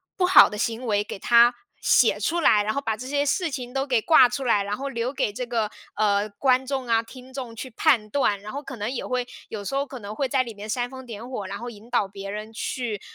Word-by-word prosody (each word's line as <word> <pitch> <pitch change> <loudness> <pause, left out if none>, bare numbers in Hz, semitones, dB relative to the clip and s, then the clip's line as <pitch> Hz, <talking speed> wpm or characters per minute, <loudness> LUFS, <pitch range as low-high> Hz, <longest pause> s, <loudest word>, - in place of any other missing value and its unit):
不 365 - +2
好 365 - +8
的 210 - -6
行 230 +3 -2
为 205 -3 +1
给 205 - -8
他 235 +2 +6 0.3
写 - - +4
出 340 +1 0
来， 210 -10 +4
然 215 +1 -1
后 - - -1
把 225 -6 -2
这 250 - -8
些 285 +1 0
事 330 +3 0
情 250 -2 -5
都 270 0 0
给 250 -5 +1
挂 255 -2 +6
出 270 +1 -4
来， 210 -4 +3
然 205 +1 -3
后 275 +1 -4
留 250 -1 -2
给 210 -6 -1
这 250 +4 -4
个， 230 -3 -1 0.3
呃， 205 0 +1
观 255 +5 +2
众 265 -2 -3
啊、 230 -1 +2
听 255 +2 -13
众 255 -4 -6
去 245 +3 -7
判 230 -4 +2
断， 210 -5 +1
然 210 +3 -9
后 285 +2 -5
可 265 - -8
能 210 +1 -3
也 255 - -4
会 250 -1 -2 0.2
有 205 -2 -6
时 270 - -3
候 275 +1 +1
可 260 -2 -9
能 205 0 -7
会 270 +2 -1
在 260 0 +2
里 235 -2 -8
面 210 +1 -9
煽 245 +2 -1
风 260 0 -10
点 230 0 -8
火， 215 -6 -4
然 185 - -5
后 240 +1 -6
引 220 0 -13
导 235 -5 +1
别 195 0 -8
人 215 +2 -6
去， 225 -2 -3
240 Hz, 290 characters per minute, -24 LUFS, 210-265 Hz, 0.3 s, 好